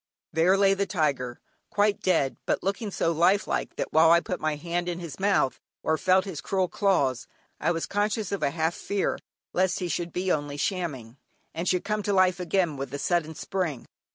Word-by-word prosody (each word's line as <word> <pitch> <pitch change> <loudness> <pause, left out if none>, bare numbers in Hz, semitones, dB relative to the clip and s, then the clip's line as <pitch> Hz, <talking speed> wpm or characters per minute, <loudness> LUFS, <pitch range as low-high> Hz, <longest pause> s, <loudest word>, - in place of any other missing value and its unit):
There 170 +5 +4
lay 195 0 +5
the 195 0 -1
tiger, 140 -9 -1 0.3
quite 205 0 +1
dead, 160 -8 +2
but - - 0
looking 200 +3 -2
so 165 -3 0
lifelike 175 +5 +1
that - - -4
while 160 +1 +6
I 170 +1 +7
put 180 +1 -4
my 155 -1 0
hand 175 +3 -2
in 175 - -3
his 170 -4 -8
mouth 195 -9 +2 0.2
or 160 - +2
felt 185 +4 +3
his 175 -8 -5
cruel 190 +2 0
claws, 170 - +1 0.3
I 165 - +1
was 165 -1 0
conscious 205 0 -1
of 200 - -2
a - - +2
half 160 +3 0
fear 200 +2 -2 0.3
lest 185 0 +2
he 180 - -2
should 175 0 -2
be 185 +2 -1
only 145 -2 -1
shamming, 145 - -3 0.4
and 170 +3 -2
should 180 -1 +1
come 210 0 -1
to 205 0 -1
life 185 -1 +3
again 175 -4 0
with 135 -1 -5
a - - -2
sudden 160 0 0
spring. 160 -6 -3
175 Hz, 200 wpm, -27 LUFS, 155-195 Hz, 0.4 s, I